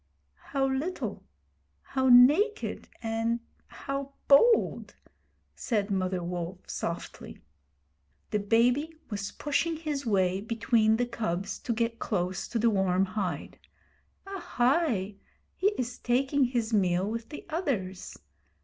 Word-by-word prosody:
'How 275 -1 0
little! 275 +7 -2 0.6
How 265 -1 0
naked, 300 - +5
and 225 +1 0 0.3
how 275 0 -5
bold!' 450 +12 +4 0.6
said 210 -4 -1
Mother 185 -2 -1
Wolf, 175 +1 -5
softly. 170 - -5 0.9
The 210 - +1
baby 245 +10 +2 0.2
was 200 -1 -3
pushing 320 +3 -1
his 300 -3 -3
way 190 -4 +1
between 225 0 +2
the 245 - +1
cubs 200 -5 -3
to - - -4
get 230 0 -1
close 185 -3 -2
to - - -3
the 230 0 +3
warm 190 -1 +2
hide. 195 -1 -4 0.7
'Ahai! 255 - 0 0.4
He 385 - +1
is 250 0 -3
taking 265 +3 +2
his 240 -2 -1
meal 185 -2 +2
with 230 +1 -4
the 295 - -9
others. 215 - -3
230 Hz, 115 wpm, -28 LUFS, 195-275 Hz, 0.9 s, naked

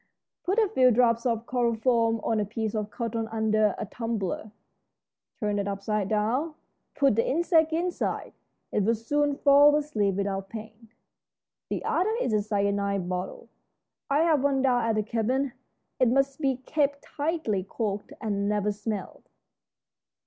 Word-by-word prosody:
Put 385 +4 0
a 445 -2 +4
few 260 -11 +4
drops 235 0 +3
of 230 -1 -1
chloroform 230 -2 +1
on 225 -1 +1
a - - +1
piece 220 +1 -3
of 215 -1 -2
cotton 230 0 -3
under 215 -2 +1
a - - -3
tumbler 215 -2 -3 0.9
turned 210 -2 0
upside 200 0 -2
down. 240 +9 0 0.4
Put 275 -6 +3
the 230 - +1
insect 325 +1 +3
inside. 345 +2 -2 0.4
It - - +1
will 230 +4 +2
soon 290 +6 0
fall 290 +1 +6
asleep 220 -10 0
without 195 -1 -2
pain. 220 0 -10 0.8
The - - -3
other 430 +5 +1
is 245 - 0
a 210 - +3
cyanide 200 -2 0
bottle. 180 +1 -5 0.6
I 285 +2 +3
have 310 -5 +3
one 275 -2 +2
down 245 -3 +2
at 225 -1 +1
the 215 - +1
cabin. 240 +5 -1 0.5
It 255 - +4
must 275 +4 +1
be 270 -3 +2
kept 285 -2 0
tightly 290 - -2
corked 205 +3 -4
and 200 -2 -1
never 210 0 +1
smelled. 205 -1 -6
230 Hz, 150 wpm, -27 LUFS, 210-275 Hz, 0.9 s, fall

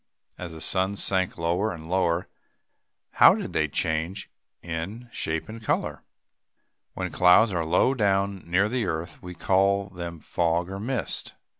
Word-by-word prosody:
As 85 -2 -7
the 80 - -9
sun 95 +3 +2
sank 95 -2 0
lower 90 +6 0
and 80 -3 -9
lower, 90 -1 +1 0.8
how - - +7
did - - -5
they - - +1
change, 85 +5 -2 0.3
in 85 +9 -5
shape 80 -5 -2
and 110 +1 -9
color? - - -1 0.9
When - - -3
clouds 90 +4 +5
are 85 -2 0
low 80 +10 +3
down, 100 -4 +1
near 95 +4 +3
the 120 -2 -1
earth, 80 0 -4
we 90 0 -8
call 100 +2 +2
them 85 -3 -7
fogs 85 +3 -1
or 95 - -5
mist. 120 -1 -3
95 Hz, 150 wpm, -26 LUFS, 85-100 Hz, 0.9 s, how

